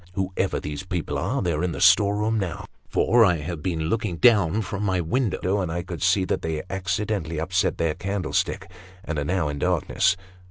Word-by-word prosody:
Whoever 95 0 -1
these 75 -1 -5
people 90 -5 -3
are, 110 - -1
they 85 -2 0
are 75 - -1
in 90 -2 -1
the - - -5
storeroom 105 +4 +4
now, 90 -5 -4 0.2
for 120 0 +4
I 90 -5 +4
have 80 +1 -5
been 85 -1 -2
looking 90 +2 -1
down 105 -2 +4
from 100 +1 -5
my 95 -3 +1
window, 100 0 0
and 90 -3 -2
I 85 +1 -3
could 85 -2 -7
see 95 +1 +3
that - - -1
they 80 -1 -3
accidentally 95 -3 -2
upset 90 +4 0
their 80 -2 +1
candlestick, 100 -1 -2 0.4
and 80 -3 -2
are - - -1
now 90 0 0
in 75 -1 -4
darkness. 90 +2 +1
90 Hz, 195 wpm, -24 LUFS, 80-100 Hz, 0.4 s, storeroom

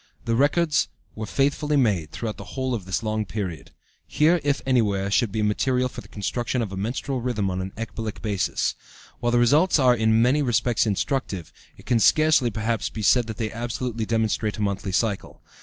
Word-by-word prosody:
The 115 - 0
records 145 +4 +2 0.3
were 110 0 -6
faithfully 145 +2 +1
made 100 - +1
throughout 110 -3 -4
the - - -10
whole 130 -1 -1
of 105 -6 -3
this 95 +4 -2
long 110 0 -1
period. 95 -8 -5 0.4
Here, 165 +3 +3
if 145 -1 +1
anywhere, 100 -7 +1
should 105 +2 +2
be 110 +1 -1
material 125 +4 +1
for - - -8
the - - -15
construction 120 +4 -2
of 100 - -5
a - - -5
menstrual 125 +6 -3
rhythm 110 -6 -1
on 90 0 -2
an 95 +1 -5
ecbolic 110 -1 -5
basis. 100 -4 -1 0.5
While 120 0 0
the 120 - +3
results 145 +11 +4
are 130 -4 +5
in 110 -1 +3
many 125 +6 +3
respects 120 -3 +1
instructive, 100 - -2 0.2
it - - -16
can 120 -2 +2
scarcely, 155 -1 +4
perhaps, 110 +1 -2
be 110 - -6
said 120 +3 +4
that 110 - -6
they 110 -3 -2
absolutely 120 -1 -3
demonstrate 110 -1 0
a - - -4
monthly 100 -1 -2
cycle. 100 +1 -2
115 Hz, 190 wpm, -24 LUFS, 105-130 Hz, 0.5 s, are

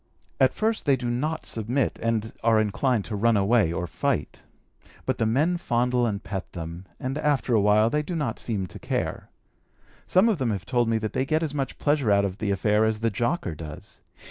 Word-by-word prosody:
At 130 - +4
first 220 -5 -1
they 140 - +5
do 120 -2 -3
not 155 +6 -2
submit, 120 +4 -1
and 110 -1 -1
are 115 -1 +4
inclined 110 +1 +1
to 110 - -4
run 115 +2 +3
away 100 -3 +3
or 90 +1 -2
fight, 80 - -2 0.6
but - - -1
the 115 - +2
men 150 +10 +2
fondle 125 -5 +1
and 100 -2 -3
pet 95 -2 -5
them, 85 +1 -7
and 135 +3 -3
after 140 -5 +1
awhile 105 +1 +4
they 150 - +1
do 170 +4 -5
not 135 -8 -2
seem 105 -5 -2
to 90 - -10
care. - - -3 0.8
Some 185 +5 +4
of 215 -8 +1
them 130 -3 0
have 100 -2 -3
told 120 -1 +1
me 115 - +2
that 110 -1 -3
they 130 - +1
get 155 +4 0
as 150 -3 -2
much 135 -2 -3
pleasure 145 -5 +1
out 100 0 +4
of 95 0 -4
the 105 - -1
affair 105 +2 +2
as 110 0 0
the 115 0 +1
jocker 120 - -1
does. 75 -1 -10
115 Hz, 210 wpm, -25 LUFS, 105-135 Hz, 0.8 s, they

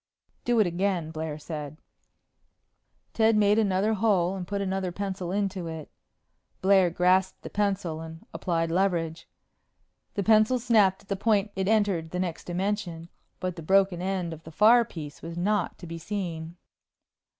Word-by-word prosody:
"Do 240 -1 +2
it 215 - +5
again," 175 -2 -1
Blair 155 -1 -4
said. 150 -1 -7 1.4
Ted 225 0 +3
made 210 0 +4
another 200 +1 +2
hole 195 -4 +2
and 180 -2 -5
put 200 +1 -2
another 190 -2 -2
pencil 190 -1 -4
into 195 -3 -2
it. 160 -2 -7 0.7
Blair 190 -2 +4
grasped 180 +2 +2
the - - -8
pencil 195 -6 -1
and 160 0 -10
applied 165 0 -1
leverage. 170 -3 0 0.9
The 200 - 0
pencil 215 +4 +4
snapped 215 -6 +3
at - - -26
the 200 - -1
point 210 0 +1
it 190 0 -1
entered 200 -7 +1
the 180 - -4
next 175 -3 -3
dimension 180 -2 -3 0.3
but 185 -1 -3
the - - -6
broken 190 +1 +3
end 185 -3 -2
of 160 - -10
the 160 - -10
far 220 +8 +6
piece 150 -7 -9
was 165 +1 -7
not 200 +1 0
to 175 - -10
be 165 0 -7
seen. 170 -2 -5
185 Hz, 160 wpm, -27 LUFS, 165-200 Hz, 1.4 s, far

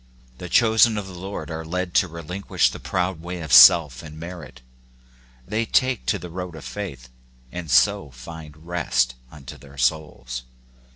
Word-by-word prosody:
The 90 - -7
chosen 110 +2 +4
of 105 - -4
the 95 - -10
Lord 95 0 -7
are 80 0 -5
led 90 +2 -4
to 95 - -6
relinquish 85 +4 -1
the - - -9
proud 90 -2 -2
way 90 +1 -6
of 80 -5 -4
self 65 +2 +8
and 80 -1 -11
merit: 85 -7 -9 0.9
they 110 +2 -1
take 130 +2 0
to - - +1
the 90 - -9
road 90 -1 -6
of 80 - -10
faith, 70 -12 -7 0.4
and 90 -3 -7
so 100 +5 +3
find 75 +4 -12
rest 75 -8 0 0.2
unto 70 -4 -11
their 70 -1 -16
souls. 65 -2 -2
85 Hz, 165 wpm, -23 LUFS, 75-90 Hz, 0.9 s, self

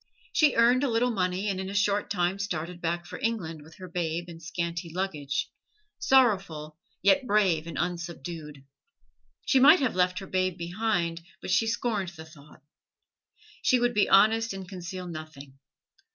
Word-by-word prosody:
She 305 -4 +4
earned 240 +3 +4
a 280 - +1
little 240 +2 +2
money 185 -1 -1
and 195 -2 -1
in 190 0 -4
a 200 - -6
short 205 0 +1
time 180 +1 0
started 180 -3 -4
back 170 +1 -2
for - - -8
England 175 -9 -2
with 160 +2 -15
her 185 - -9
babe 170 -1 -2
and 165 -1 -10
scanty 170 0 -4
luggage 155 -6 -2 0.5
sorrowful, 190 - +2 0.2
yet 255 +7 +4
brave 190 -7 +2
and 170 - -6
unsubdued. 170 -4 -5 0.8
She 270 - +4
might 300 +7 +8
have 260 -4 0
left 180 0 +1
her 195 - -5
babe 185 -1 -1
behind, 175 -2 -1 0.2
but - - -5
she 225 +3 +3
scorned 220 -4 -1
the 160 -2 -11
thought. 150 -2 -17 1.0
She 255 - +3
would 245 0 +1
be 210 - +2
honest 225 +2 +4
and 190 -1 -7
conceal 185 0 -7
nothing. 155 -5 -9
180 Hz, 165 wpm, -27 LUFS, 165-210 Hz, 1.0 s, might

